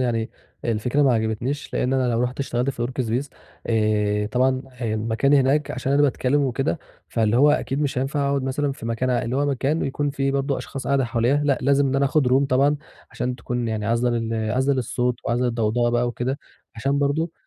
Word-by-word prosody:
يعني، 115 -3 0 0.3
الفكرة 120 +5 +1
ما 135 - +4
عجبتنيش 115 +6 -2
لإن 125 - 0
أنا 125 -2 +1
لو 115 - +1
رُحت 125 +2 -2
اشتغلت 125 0 -1
في 120 -2 -3
الWorkspace، 125 +1 -2 0.4
آآ 105 -2 +1
طبعًا 130 +3 +1
ه 120 -3 -3
المكان 115 +5 +1
هناك 140 +2 +3
عشان 130 +2 -2
أنا 145 +1 +4
باتكلّم 140 0 +2
وكده، 135 +4 -1 0.3
فاللي 110 -1 +1
هو 145 +4 +6
أكيد 145 -1 0
مش 140 -2 -1
هينفع 140 +2 0
أقعد 140 -1 0
مثلًا 140 +2 -1
في 125 - -8
مكان 115 +3 -1
ع 120 -2 +1
اللي 120 +3 -2
هو 145 +1 +1
مكان 140 +3 0
ويكون 145 +1 -1
في 135 -1 -1
برضو 140 0 0
أشخاص 135 -1 -7
قاعدة 140 -1 +2
حواليّا، 120 +3 +1
لأ 140 -2 +2
لازم 140 +1 +3
إن 135 0 0
أنا 140 - +3
آخد 140 -1 +2
Room 135 +2 +3
طبعًا، 140 +3 +3 0.3
عشان 125 0 -3
تكون 120 -1 -3
يعني 110 -1 -2
عازلة 115 +2 +1
لل 115 -2 -1
عازلة 130 +3 +2
للصوت 125 -1 0
وعازلة 120 +2 +1
للضوضاء 120 0 +1
بقى 120 +1 +1
وكده، 125 +3 -2 0.4
عشان 135 +5 0
برضو، 150 +4 0
130 Hz, 205 wpm, -23 LUFS, 120-140 Hz, 0.4 s, هو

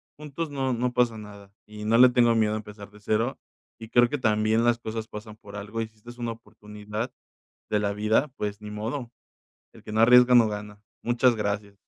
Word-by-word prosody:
juntos 150 +1 -6
no 135 -2 -1
no 125 +1 -1
pasa 120 -2 +1
nada, 100 -2 -12
y 105 0 -9
no 115 +2 +3
le 125 0 +8
tengo 120 -2 +3
miedo 110 -1 +2
a 110 - -1
empezar 105 -1 -10
de 105 - -16
0, 110 +5 -1 0.4
y 110 -1 -10
creo 120 +1 +5
que 145 +1 -3
también 110 0 +2
las 120 0 +3
cosas 110 -1 -5
pasan 105 0 -9
por 105 -1 -13
algo, 105 +3 -5
y 110 - -3
si 110 - -28
esta 120 +3 -12
es 120 - -16
una 115 -1 -3
oportunidad 105 +1 -7 0.6
de 105 - +2
la 100 -1 0
vida, 110 +7 +1
pues, 105 0 -4
ni 105 - -8
modo, 115 +4 -5 0.6
el - - -15
que 105 - -9
no 110 - +1
arriesga 125 +2 +7
no 115 -3 +6
gana. 105 0 -7 0.2
Muchas 120 0 +2
gracias. 100 -1 -3
110 Hz, 215 wpm, -26 LUFS, 105-120 Hz, 0.6 s, le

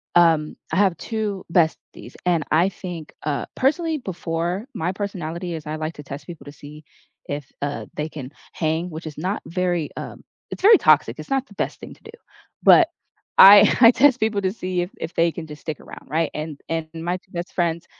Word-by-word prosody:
um, 165 -3 +4 0.2
I - - 0
have 195 -3 +3
2 215 -4 -4
besties 165 -3 -1
and 170 -3 +2
I 170 +5 +4
think 175 -4 -8
uh, 145 -2 -2
personally 315 +4 +1
before, 175 -1 -3
my 165 +3 -2
personality 180 -3 -4
is 155 -1 -7
I 155 - -3
like 155 +1 -4
to 150 - -10
test 140 +2 -8
people 170 -3 -10
to 145 - -9
see 150 +2 -12 0.4
if, 145 -2 -5
uh, 145 0 -3
they 150 +1 -3
can 140 -3 -8 0.2
hang, 160 +2 -1
which 160 0 -8
is 150 - -8
not 185 +6 -2
very, 175 -1 -1
um - - -8 0.3
it's - - -7
very 430 +2 +9
toxic, - - +3
it's - - -9
not 270 -1 0
the 205 - -16
best - - -3
thing - - -10
to - - -22
do. 445 - -11 0.5
But 345 - +7 0.5
I 200 +1 +10
I 230 - +10
test 265 0 +4
people 220 -2 0
to 190 -1 0
see 185 -4 -2
if 175 - -3
if 165 +1 -5
they 165 0 +2
can 165 -2 -7
just 150 -1 -10
stick 155 -3 -5
around, - - -12
right? 160 0 0
And 150 -1 -6
and 165 -1 -2
my 175 +2 -2
2 185 - -27
best 175 0 -6
friends 170 -2 -1
170 Hz, 205 wpm, -22 LUFS, 155-195 Hz, 0.5 s, I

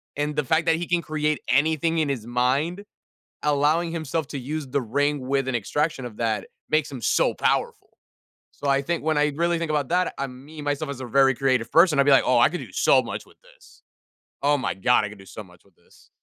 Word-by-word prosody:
and 145 +1 -2
the 150 -2 -1
fact 160 +5 +1
that 165 - +4
he 175 - -4
can 175 -1 +1
create 155 -1 -1
anything 160 +3 +2
in 155 -2 +1
his 120 -5 -3
mind, 135 +11 0 0.6
allowing 150 +3 +1
himself 160 -2 -3
to 140 - -5
use 145 +3 -4
the 140 +2 -1
ring 145 +5 0
with 135 -1 0
an 130 - -2
extraction 135 +4 -1
of 110 -3 -10
that 110 -4 -1 0.2
makes 155 -1 +1
him 130 -4 -8
so - - +2
powerful. - - -1 0.6
So, 145 - -7
I 135 0 +3
think 170 +2 -3
when 155 -1 +1
I 150 0 +2
really 170 +1 +1
think 165 -2 -3
about 145 -3 0
that, 180 +1 +1
um, 130 -1 -6
me, 155 0 -10
myself 145 +1 -2
as 135 - -7
a - - -5
very 135 +2 +4
creative 130 -4 0
person, 165 -2 +5
I'd - - +6
be 145 - +4
like, 135 - +6
"Oh, 125 -2 +3
I - - +5
could 180 - -4
do - - -11
so - - +4
much - - -6
with - - -22
this. - - -21 0.6
Oh 145 +1 +4
my 130 - -2
God. 105 +3 +2
I - - -5
could 105 - -12
do 95 - -14
so 105 +3 -9
much 90 -2 -20
with - - -27
this." - - -24
145 Hz, 235 wpm, -24 LUFS, 130-160 Hz, 0.6 s, I'd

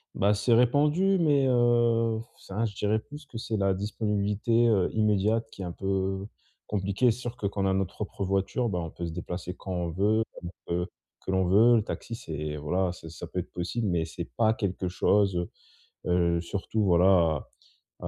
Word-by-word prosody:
Bah, 100 +2 +3
c'est 105 +3 +2
répandu 150 +11 +3
mais, 145 -5 +3
heu, 120 -2 +3
f - - -12
ça 100 +4 -4
je 110 -2 -2
dirais 105 +2 0
plus 145 +6 -11
que 120 - -9
c'est 110 -1 -3
la 100 -1 +2
disponibilité, 105 +3 0
heu, 100 -5 +2
immédiate 105 +1 +2
qui - - -10
est 95 - -3
un 85 - -5
peu 95 0 -2 0.4
compliquée, 100 +4 +1
c'est 115 - -5
sûr 120 -1 -5
que 105 - -6
quand 100 0 -2
on - - +3
a 95 - +2
notre 95 -2 0
propre 100 -1 -5
voiture 100 +6 0
bah, 90 -3 -1
on 85 -1 -4
peut 85 - -5
se 85 - -4
déplacer 90 +1 -5
quand 95 - -6
on 90 -1 -2
veut, 105 +6 +2 0.2
comme 85 - -6 0.2
on - - 0
veut, 90 0 0 0.4
que 95 - -2
l'on 95 0 +2
veut. 110 +7 +6
Le 110 - +1
taxi, 115 +2 -5
c'est 75 -7 -5
voilà, 90 +5 -1
c'est 80 - -11
ça 85 +1 -8
peut 90 - -3
être 90 - -6
possible, 100 +6 -2
mais 85 -2 0
c'est 85 +1 -6
pas 110 -1 +4
quelque 95 -4 -2
chose, 100 +1 +2
heu 85 0 -2 0.6
heu, 85 -1 +2
surtout, 100 +4 -2
voilà, 85 -4 +4 0.5
à - - -5
100 Hz, 210 wpm, -28 LUFS, 90-115 Hz, 0.6 s, veut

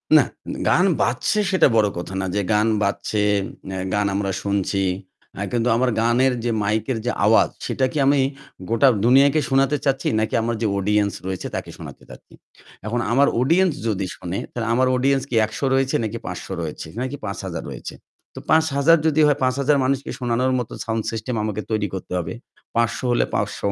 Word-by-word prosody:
না, - - +7 0.4
গান - - +4 0.2
বাজছে 215 - +1
সেটা 185 - +5
বড় 110 -2 +4
কথা 90 +2 -6
না। - - -2
যে 105 - +1
গান 105 +1 +3 0.2
বাজছে, 105 +1 -1 0.5
এ্যা 95 -1 -4
গান 105 0 +1
আমরা 100 -1 -1
শুনছি। 100 -1 -1 0.6
আ - - -3
কিন্তু 120 0 +1
আমার 125 +2 +2
গানের 125 +3 +3
যে 120 - 0
মাইকের 110 +4 -1
যে 125 - +1
আওয়াজ - - +5 0.2
সেটা 130 - 0
কি - - -4
আমি 140 +1 +4 0.5
গোটা 115 +5 +4 0.2
দুনিয়াকে 140 +5 +5
শোনাতে 135 +2 +2
চাচ্ছি 135 -1 0
নাকি 110 - -1
আমার 115 +1 -1
যে 110 - +1
অডিয়েন্স 105 +1 +1
রয়েছে 95 -1 -4
তাকে - - -4
শোনাতে - - -10
চাচ্ছি? - - -14 0.5
এখন 115 +3 -1
আমার 140 +4 +4
অডিয়েন্স 170 +7 +3 0.2
যদি 100 -3 -1
শোনে 90 0 -5
তাহলে 115 -1 -3
আমার 130 +2 +3
অডিয়েন্স 135 +1 +2
কি - - -2
১০০ 110 0 -8
রয়েছে? 135 0 +1 0.3
৫০০ - - -5 0.2
রয়েছে। - - -6
নাকি 130 +2 -3
৫০০০ 95 -4 -5
রয়েছে। - - -7 0.4
তো - - -8
৫০০০ 160 0 +4
যদি 155 0 +2
হয় 145 -1 +3
৫০০০ 140 +3 +2
মানুষকে 135 +1 -1
শোনানোর 125 +1 0
মতো 120 - -5
সাউন্ড 115 -1 -1
সিস্টেম 115 +2 -4
আমাকে 110 0 -2
তৈরি 110 -1 0
করতে 95 -1 -6
হবে। 85 +2 -3 0.4
৫০০ 115 0 +1
হলে 120 - +2
৫০০ - - -1
120 Hz, 175 wpm, -22 LUFS, 105-135 Hz, 0.6 s, না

